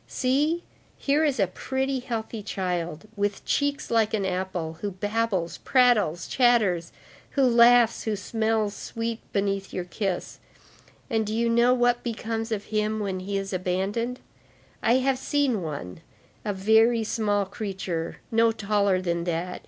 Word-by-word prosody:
See, 295 +6 +1 0.3
here 290 +3 +2
is 285 -6 +1
a 195 - +5
pretty, 265 +8 -2
healthy 225 -2 -4
child, 180 -3 -3
with 205 -1 -2
cheeks 285 -1 0
like 225 -1 +3
an 200 -2 -1
apple, 180 -3 -3
who 205 - -1
babbles, 200 -2 -1
prattles, 215 - +3
chatters, 215 -10 +2 0.5
who 275 - +5
laughs, 235 -1 +5
who 220 -1 0
smells 220 +1 0
sweet 230 0 -4
beneath 195 -1 -1
your 180 - -3
kiss,—and 205 +4 -5
do 215 - -2
you 230 0 +1
know 240 +2 +4
what 245 -1 +2
becomes 225 -1 -3
of 210 -2 -1
him 215 0 0
when 195 -3 -2
he 195 +2 -3
is 195 0 -4
abandoned? 195 +7 -1 0.6
I 230 - +3
have 260 0 +1
seen 270 -7 +1
one, 140 - -6 0.4
a 210 - -1
very 220 +4 +4
small 205 -2 0
creature, 190 -4 -4
no 230 0 +4
taller 200 -3 +1
than 170 -1 -1
that. 175 +1 -2
215 Hz, 145 wpm, -26 LUFS, 190-235 Hz, 0.6 s, a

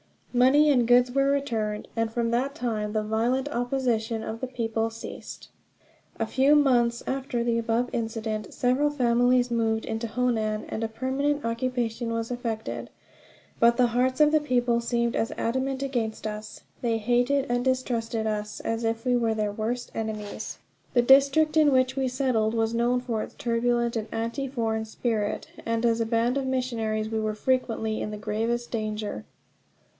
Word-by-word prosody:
Money 270 +5 +5
and 245 -4 +3
goods 245 +1 +5
were 275 +1 +2
returned, 225 -7 -1
and 225 -1 0
from 230 0 -1
that 265 +4 0
time 215 -6 -2
the 215 -1 0
violent 235 +5 0
opposition 240 -3 -1
of 220 +1 -5
the 260 - -3
people 225 -2 -1
ceased. 225 0 -9 0.7
A 225 - +1
few 270 +6 +4
months 240 -5 +3
after 265 -3 -2
the 235 -1 +1
above 230 +2 0
incident 225 -2 -3
several 255 +4 +2
families 245 -2 +2
moved 225 -1 0
into 225 +1 -3
Honan, 220 -3 0
and 220 - -3
a - - +1
permanent 265 +5 -1
occupation 230 -1 -2
was 230 +1 -3
effected; 230 -3 -4 0.7
but 235 0 +5
the 250 -1 +5
hearts 255 +4 +1
of 300 0 +6
the 310 - +4
people 245 -4 +1
seemed 235 0 0
as 225 - -1
adamant 260 +3 -1
against 235 -6 -2
us. 215 0 -6 0.2
They 230 -2 +1
hated 245 +5 +2
and 245 0 +1
distrusted 235 -3 -1
us 210 -1 -3
as 225 +1 -2
if 225 0 -1
we 250 -1 +3
were 225 -2 +1
their 210 -1 -1
worst 230 +4 -3
enemies. 215 -2 -5 0.4
The 240 - +4
district 280 +5 +5
in 300 -2 +6
which 260 0 +2
we 265 -1 +1
settled 245 -4 0
was 225 0 +1
known 240 +2 +1
for 235 -3 -2
its - - -7
turbulent 235 0 0
and 220 0 -3
anti 230 +5 -2
foreign 225 -4 -1
spirit, 220 -1 -2
and 230 +1 -1
as 230 -1 +2
a - - +1
band 235 +3 +1
of 270 -1 -1
missionaries 225 -4 -1
we 220 0 -1
were 215 -1 -1
frequently 225 -2 0
in - - -3
the 210 - -5
gravest 230 +3 -2
danger. 215 - -3
235 Hz, 170 wpm, -26 LUFS, 225-255 Hz, 0.7 s, of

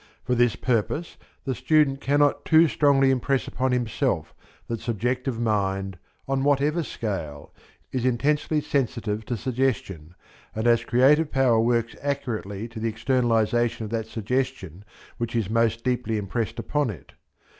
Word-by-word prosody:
For 125 - -1
this 120 -2 +3
purpose 130 +7 -1 0.3
the 135 - -1
student 145 +1 +2
cannot 145 +1 +2
too 165 +1 +5
strongly 140 -3 +3
impress 130 +1 0
upon 130 +1 -1
himself 120 -3 -1 0.3
that 115 -1 -4
subjective 120 +2 -2
mind, 95 -4 -1 0.3
on 135 0 0
whatever 145 +4 +2
scale, 90 - -5 0.4
is 130 -2 -2
intensely 145 +5 +1
sensitive 115 -7 -2
to 120 0 -3
suggestion, 115 - -2 0.4
and 110 +1 -2
as 120 -1 +4
creative 140 +6 +4
power 130 -4 +3
works 115 0 +1
accurately 115 -7 -3
to 115 -1 -8
the 115 +1 -1
externalization 115 0 +1
of 105 - -8
that 110 -1 -2
suggestion 110 - -3 0.4
which 120 0 -3
is 110 -3 -1
most 115 0 +1
deeply 125 -3 -1
impressed 105 +3 -3
upon 145 -3 -1
it. 85 -10 -9
120 Hz, 140 wpm, -25 LUFS, 110-135 Hz, 0.4 s, too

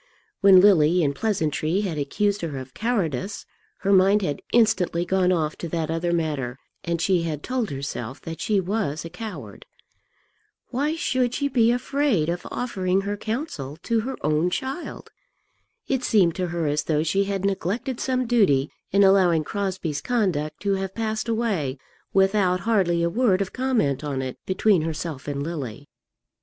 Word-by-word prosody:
When 195 -2 +8
Lily 180 -3 +5
in 140 -1 +1
pleasantry 165 -2 0
had 175 -7 -3
accused 200 +8 0
her 155 -5 -4
of 130 -1 -8
cowardice, 200 - -2 0.4
her 200 +1 +2
mind 195 +2 +5
had 145 -5 -2
instantly 210 -7 +2
gone 185 0 +2
off 155 -4 0
to 170 - -4
that 160 -1 -2
other 165 +1 -1
matter, 145 -7 -1 0.3
and 170 -2 -1
she 180 +1 +2
had 155 -3 -3
told 255 -4 -1
herself 135 -3 -5
that 165 0 -7
she 210 -2 +2
was 185 -5 -2
a 165 - -7
coward. 215 +4 -8 1.0
Why 290 +5 0
should 255 -6 0
she 285 - 0
be 235 -4 +3
afraid 250 - +1
of 175 +1 -3
offering 190 -6 -1
her 200 +1 -3
counsel 215 - -4
to 230 -1 +1
her 260 +5 -4
own 155 +3 +2
child? 265 - -5 0.8
It 265 -2 0
seemed 185 -8 +3
to 180 -1 -1
her 170 -1 -2
as 145 0 0
though 155 -1 +1
she 195 +5 +1
had 195 -1 -2
neglected 215 +7 -2
some 255 -1 0
duty 195 - +3 0.2
in 200 +1 +5
allowing 185 -5 +4
Crosbie's 185 -5 -3
conduct 180 - -1
to 200 -1 +1
have 190 0 -4
passed 220 0 -2
away 200 - -1 0.3
without 190 -2 +3
hardly 175 -6 +2
a 170 - +2
word 215 -3 +2
of 195 -2 -3
comment 235 - 0
on 135 -3 -2
it 130 -1 -6
between 190 -1 +3
herself 160 -3 -4
and 140 -1 -2
Lily. 145 -5 -5
185 Hz, 165 wpm, -24 LUFS, 155-220 Hz, 1.0 s, When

